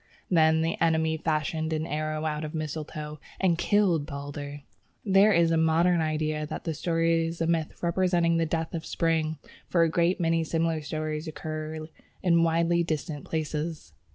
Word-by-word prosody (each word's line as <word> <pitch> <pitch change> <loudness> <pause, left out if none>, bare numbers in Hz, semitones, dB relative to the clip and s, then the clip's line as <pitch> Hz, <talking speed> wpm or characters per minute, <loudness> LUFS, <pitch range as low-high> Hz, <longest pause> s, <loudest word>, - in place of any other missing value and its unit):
Then 160 -2 +4
the 165 +1 -2
enemy 160 -1 +2
fashioned 160 0 -1
an 155 0 -1
arrow 155 0 -2
out 150 0 -2
of 155 - -5
the - - -2
mistletoe, 150 0 -5 0.2
and 185 -3 +3
killed 180 -8 +2
Balder. 145 -1 -6 0.4
There 195 +1 +5
is 170 -3 +4
a 165 - +3
modern 165 +2 +3
idea 155 -1 -1
that - - -6
the 165 - -2
story 165 +1 +1
is 165 +1 -6
a 165 - +1
myth 165 -1 -1
representing 170 -1 +2
the 165 -1 +1
death 165 0 -2
of 165 -1 -3
Spring, 160 -1 0 0.3
for 170 -2 +3
a 165 - +3
great 170 +3 +1
many 165 -1 +2
similar 165 0 0
stories 155 +1 -4
occur 155 0 -5 0.4
in 170 -2 +4
widely 170 +1 +2
distant 155 -2 -3
places. 155 - -3
160 Hz, 170 wpm, -27 LUFS, 155-165 Hz, 0.4 s, There